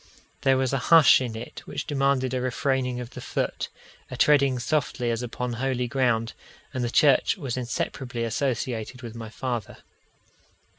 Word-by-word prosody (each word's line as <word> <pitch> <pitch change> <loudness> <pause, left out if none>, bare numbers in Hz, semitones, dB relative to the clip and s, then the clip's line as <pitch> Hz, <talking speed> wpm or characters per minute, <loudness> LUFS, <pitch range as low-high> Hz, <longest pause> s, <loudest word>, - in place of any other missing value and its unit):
There 135 -1 +4
was 130 0 0
a 135 - +1
hush 165 -5 +8
in 120 -3 -3
it 110 - -7
which - - -4
demanded 135 -3 +1
a 130 - 0
refraining 125 0 0
of 125 -1 -7
the - - -8
foot, - - -2 0.4
a - - -6
treading 140 -3 +4
softly 125 -1 -1
as 115 0 -2
upon 125 0 -4
holy 125 0 -1
ground; 120 -3 +1 0.4
and 130 -2 -2
the 120 - 0
church 140 +7 +4
was 135 -9 -3
inseparably 120 -1 -3
associated 120 0 -2
with 115 -2 -7
my 115 -1 -7
father. 120 -2 -4
125 Hz, 160 wpm, -26 LUFS, 120-135 Hz, 0.4 s, hush